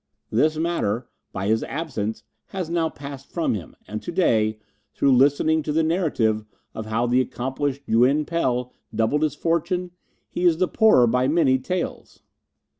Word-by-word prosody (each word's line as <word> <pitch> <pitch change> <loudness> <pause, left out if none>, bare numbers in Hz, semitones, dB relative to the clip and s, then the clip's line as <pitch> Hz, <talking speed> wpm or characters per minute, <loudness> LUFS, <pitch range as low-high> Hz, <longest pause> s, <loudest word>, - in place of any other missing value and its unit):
This 155 +8 +2
matter, 130 -9 -1 0.2
by 95 0 -4
his 110 +2 +1
absence, 115 -9 -4 0.2
has 180 -4 -5
now 165 -2 +1
passed 140 -2 -9
from 170 -7 0
him, 95 -7 -6
and 105 0 -5
to - - -6
day, 110 - +2 0.4
through 135 -2 +4
listening 145 +4 +3
to 150 - -3
the 160 +2 +2
narrative 145 - +1 0.3
of 110 -1 -6
how 115 +2 0
the 125 +1 +3
accomplished 135 +2 -3
Yuin 130 +7 +3
Pel 125 -7 -1 0.2
doubled 115 +7 +1
his 155 -2 0
fortune, 170 +3 -1 0.4
he 175 - -4
is 170 -3 +4
the 185 +1 +2
poorer 215 - +5
by 125 +2 +2
many 140 -4 +3
taels." 180 +7 -5
140 Hz, 160 wpm, -23 LUFS, 120-165 Hz, 0.4 s, poorer